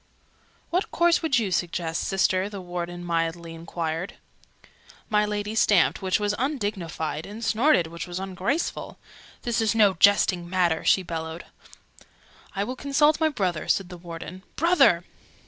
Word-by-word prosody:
"What 360 +3 0
course 345 0 +3
would 315 -6 +2
you 215 -5 0
suggest, 170 -2 -1
Sister?" 190 0 +1
the 205 -2 -7
Warden 175 -1 -5
mildly 165 0 -2
enquired. 165 +1 -4 1.0
My 210 0 +3
Lady 210 0 -3
stamped, 205 -5 +3
which 190 +1 +1
was 205 0 0
undignified: 205 - -3
and 220 +3 -7
snorted, 235 - +3
which 170 +2 -7
was 175 +1 -5
ungraceful. 195 - -3 0.5
"This 235 -2 0
is 220 0 +1
no 210 -3 +5
jesting 185 -2 +3
matter!" 175 -3 +1
she 190 - +4
bellowed. 165 -1 -5 1.1
"I 195 - 0
will 255 +5 -4
consult 290 +3 +2
my 320 -1 +3
brother," 185 - -2
said 195 -2 +1
the 180 - -9
Warden. 170 +1 -8
"Brother!" 340 +3 +4
190 Hz, 145 wpm, -25 LUFS, 170-220 Hz, 1.1 s, no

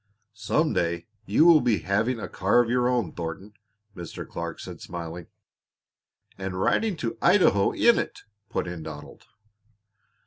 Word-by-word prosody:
"Some 150 +9 0
day 85 0 -1 0.2
you 110 +11 +4
will 165 -3 +7
be 115 -4 +2
having 110 +7 0
a - - -5
car 100 +5 +2
of 120 -1 +2
your 125 0 +2
own, 120 -9 0
Thornton," 90 +5 -6 0.4
Mr. 85 -2 -7
Clark - - -6
said, - - -9
smiling. 85 0 -7 1.1
"And 95 -1 -4
riding 210 - +1
to 115 -4 -4
Idaho 100 - +4
in 235 - +4
it," - - -5 0.3
put - - -2
in 85 -2 -6
Donald. 75 -2 -10
100 Hz, 145 wpm, -26 LUFS, 85-125 Hz, 1.1 s, will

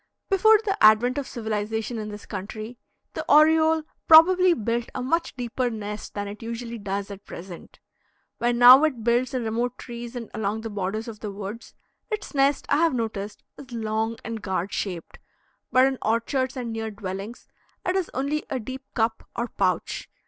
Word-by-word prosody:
Before 435 +3 +6
the 395 -1 -1
advent 230 +5 +6
of 280 - -5
civilization 220 +1 -3
in 215 0 -5
this 205 0 -9
country, 215 +4 -7 0.3
the - - -4
oriole 315 +1 +5 0.2
probably 360 +2 +7
built 230 +1 -2
a - - -2
much 330 +6 0
deeper 245 0 -2
nest 210 -2 -6
than 205 0 -3
it 205 +1 -8
usually 230 0 -5
does 200 0 -4
at 200 0 -9
present. 175 0 -10 0.6
When 240 0 +1
now 250 +4 +9
it 265 -8 0
builds 245 +3 +1
in 250 - -1
remote 235 +2 -2
trees 235 0 -8
and 235 -2 -6
along 215 +1 -2
the 225 0 -6
borders 205 +3 -3
of 220 -2 -8
the 210 -1 -5
woods, 205 +3 -8 0.3
its 430 -5 -4
nest, 275 0 +2
I 285 - +3
have 330 -3 +3
noticed, 215 -3 -4 0.2
is 265 -3 -12
long 220 0 -2
and 225 -1 -5
gourd 190 0 -2
shaped; 180 -5 -4 0.5
but 255 +1 +6
in 265 -1 0
orchards 255 +4 0
and 235 -3 -4
near 225 0 -3
dwellings 200 +2 -7 0.4
it 365 - 0
is 380 -3 0
only 280 +4 -1
a 265 - -2
deep 260 +3 -7
cup 225 -1 -1
or 235 0 -2
pouch. 185 -5 -1
230 Hz, 180 wpm, -25 LUFS, 210-260 Hz, 0.6 s, now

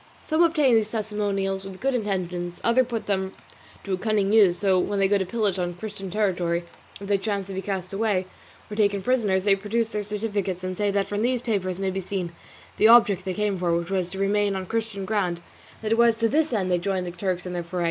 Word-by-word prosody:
Some 315 +1 +2
obtain 310 -6 +4
these 220 -2 +3
testimonials 205 -3 -2
with 190 -1 -9
good 270 +1 0
intentions, 180 -6 -2
others 235 +1 +3
put 230 -3 -3
them 190 -1 -1 0.5
to 195 - -3
a - - +1
cunning 210 -1 +1
use; 195 -6 +5
for 190 -2 +3
when 200 +2 -1
they 195 -1 +3
go 200 +1 +2
to 190 - -2
pillage 205 -3 0
on 175 -1 -2
Christian 200 0 -7
territory, 175 -4 0 0.4
if 200 - -8
they 200 -1 +2
chance 200 -1 -2
to - - -5
be 190 - -3
cast 190 -2 -4
away, 200 -3 +1 0.5
or - - -4
taken 200 -2 +1
prisoners, 210 -7 +1
they 200 -1 +4
produce 220 +3 -1
their 210 -2 -2
certificates 205 -3 -3
and 185 0 -3
say 205 +1 0
that 200 0 +1
from 205 0 -3
these 245 +1 0
papers 190 -5 -1
may 195 -1 -1
be 190 +1 -3
seen 185 -2 -3 0.5
the 215 - +6
object 210 -5 +6
they 185 -1 -2
came 210 -3 0
for, 170 -2 +1
which 170 +2 -4
was 185 -2 0
to 190 - -7
remain 200 0 +1
on 190 -1 -3
Christian 220 -1 -3
ground, 190 -5 0
and 170 - -18 0.4
that 215 - -2
it 225 - +2
was 235 -1 +5
to 230 0 +1
this 305 +5 +1
end 190 -5 0
they 175 - +2
joined 190 0 -1
the 175 - -4
Turks 180 0 -3
in 180 - -5
their 175 - -2
foray. 175 +2 -5
200 Hz, 240 wpm, -25 LUFS, 185-215 Hz, 0.5 s, the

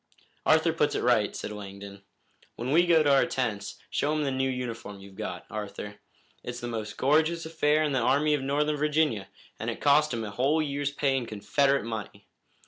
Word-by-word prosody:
"Arthur 160 +1 +4
puts 150 -2 +1
it - - -1
right," 120 -4 +2
said - - -5
Langdon. 100 -1 -9 0.5
"When 125 +3 -3
we 175 +4 +4
go 165 -2 +5
to 145 -2 +4
our 135 - +4
tents, 110 -6 -3
show 145 - 0
him 155 -1 0
the 140 - 0
new 130 0 0
uniform 115 -5 -5
you've 95 0 -13
got, 90 -1 -6
Arthur. 105 -1 -6 0.5
It's - - -5
the 120 - -5
most 110 -2 -5
gorgeous 160 +4 +2
affair 155 -1 +2
in 150 - 0
the 130 - +1
Army 140 +5 +3
of 145 - +1
Northern 150 +2 0
Virginia, 150 -9 +1 0.3
and 115 - -2
it 115 - -4
cost 150 +1 +4
him 115 -2 -2
a 105 - -5
whole 135 +9 +1
year's 145 -2 -1
pay 140 -1 0
in 125 -3 -2
Confederate 135 +7 +1
money. 110 -3 -6
135 Hz, 200 wpm, -28 LUFS, 110-150 Hz, 0.5 s, go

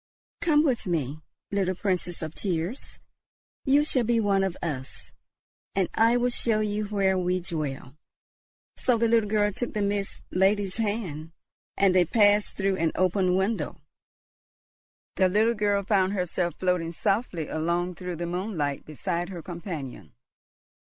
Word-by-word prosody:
Come 300 -3 +4
with 255 -8 0
me, 155 -3 -2 0.3
little 190 -2 0
Princess 180 -3 -2
of 160 0 -5
tears; 185 - -3 0.7
you 285 +2 +4
shall 260 -5 +1
be 235 0 +2
one 200 -3 +2
of 190 -3 -2
us, 135 -6 -5 0.6
and 190 -2 +1
I 230 +2 +4
will 245 0 +1
show 225 -2 +1
you 210 0 -1
where 195 -2 +1
we 180 0 +1
dwell." 150 -6 -4 0.8
So 250 -2 +2
the 230 +1 +2
little 225 -2 +3
girl 210 -1 +2
took 240 +5 -4
the 210 - 0
Mist 200 0 -2
Lady's 195 +1 +2
hand, 190 -8 -3 0.4
and 195 -2 +4
they 180 -1 +5
passed 205 +2 +3
through 195 -1 +1
an 165 -2 +1
open 185 0 +2
window. 190 -3 -1 1.4
The 185 0 +4
little 220 +5 +3
girl 205 -2 +1
found 195 -1 +2
herself 180 -2 -1
floating 180 -2 0
softly 185 - -1
along 170 +3 -1
through 180 0 -5
the 170 +1 -4
moonlight 170 -5 -2
beside 170 +4 -3
her 175 -4 -7
companion. 160 - -7
190 Hz, 145 wpm, -27 LUFS, 170-210 Hz, 1.4 s, they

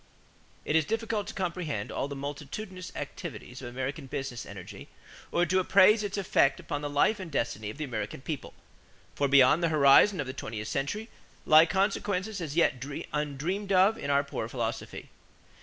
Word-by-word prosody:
= - - -32
It 150 - 0
is 160 - +5
difficult 225 +3 -2
to - - -6
comprehend 170 - -3
all - - -2
the 140 - -6
multitudinous 150 +7 -6
activities 125 -4 -7
of 125 - -6
American 135 +3 -4
business 130 -2 -5
energy 100 +1 -10 0.4
or 175 - +2
to 185 +3 +2
appraise 200 +3 +5
its 205 -1 -3
effects 140 -8 +2
upon 145 - -4
the 145 - -3
life 145 +9 +2
and 185 -3 -6
destiny 115 -6 -2
of 110 - -8
the 155 - -3
American 110 -6 -4
people; 145 -1 -6 0.6
for 140 - +1
beyond 140 +3 +6
the 170 - +2
horizon 150 +6 +6
of 145 - -1
the 130 - -5
twentieth 110 -5 -6
century 175 +11 -2 0.4
lie 155 +2 +7
consequences 195 +1 -1
as 155 -3 -5
yet 145 -6 +2 0.3
undreamed 150 +8 -2
of 195 +3 +5
in 225 - -5
our 140 0 +3
poor 130 -5 -5
philosophy. 120 -2 -4
150 Hz, 175 wpm, -29 LUFS, 135-185 Hz, 0.6 s, lie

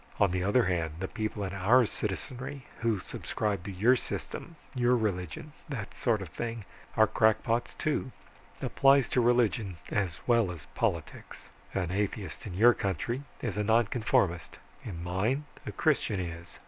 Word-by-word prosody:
On 100 -3 +4
the 90 0 0
other 105 +6 +4
hand, 85 -3 0
the 95 - -2
people 110 -1 -3
in 95 -1 -3
our 110 +7 +5
citizenry 125 +7 -4
who 115 -2 +1
subscribe 100 0 -3
to 100 - -4
your 110 +8 +4
system, 165 +6 -5 0.2
your 125 -1 +3
religion, 100 - -3 0.2
that 115 -9 -5
sort 110 -5 +1
of 90 - -9
thing, 115 +4 -4 0.3
are 110 - +7
crackpots, 115 +2 +2
too. 145 -3 -1 0.5
Applies 135 -1 +5
to 125 - +3
religion 115 -6 +2
as 95 -7 -1
well 115 -5 +4
as 80 -5 -9
politics. - - -3 0.3
An 90 -3 0
atheist 100 +1 -3
in 90 - -6
your 120 +5 +7
country 115 +6 -2 0.2
is 105 -4 -2
a - - +2
nonconformist 110 -5 +2 0.3
in 85 -6 -6
mine, 105 +11 0 0.2
a - - -2
Christian 100 - +1
is. 85 -1 -6
105 Hz, 155 wpm, -30 LUFS, 95-120 Hz, 0.5 s, are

